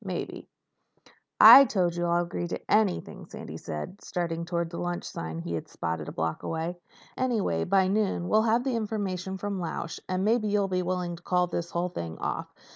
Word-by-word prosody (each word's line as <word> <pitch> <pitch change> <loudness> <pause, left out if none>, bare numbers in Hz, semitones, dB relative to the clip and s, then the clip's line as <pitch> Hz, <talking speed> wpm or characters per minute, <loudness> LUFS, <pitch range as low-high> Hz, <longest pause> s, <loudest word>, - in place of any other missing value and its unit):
Maybe—" - - -5 0.9
"I 275 - +12
told 180 -7 0
you 175 0 -1
I'd 170 0 +2
agree 175 0 -4
to - - -4
anything," 210 -4 +1
Sandy - - -8
said, 80 - -6
starting 170 -2 -3
toward 170 -1 -2
a - - -4
lunchroom 175 0 -3
sign 80 0 -5
he 85 0 -4
had 80 - -4
spotted 80 0 -4
a - - -5
block 80 0 -2
away. 165 +2 -3 0.4
"Anyway, 220 - 0
by 190 0 +3
noon 195 -3 0
we'll 215 +3 +4
have 230 +2 +2
the 260 -2 -1
information 195 -4 -3
from 200 0 -3
Lausch 165 -1 -4
and 185 +1 0
maybe 220 0 +2
you'll 205 -1 +1
be 185 -1 0
willing 180 -1 -2
to - - -16
call 180 0 +2
this 170 -1 -4
whole 175 +1 -1
thing 85 - -6
off. - - -3
180 Hz, 195 wpm, -28 LUFS, 170-200 Hz, 0.9 s, I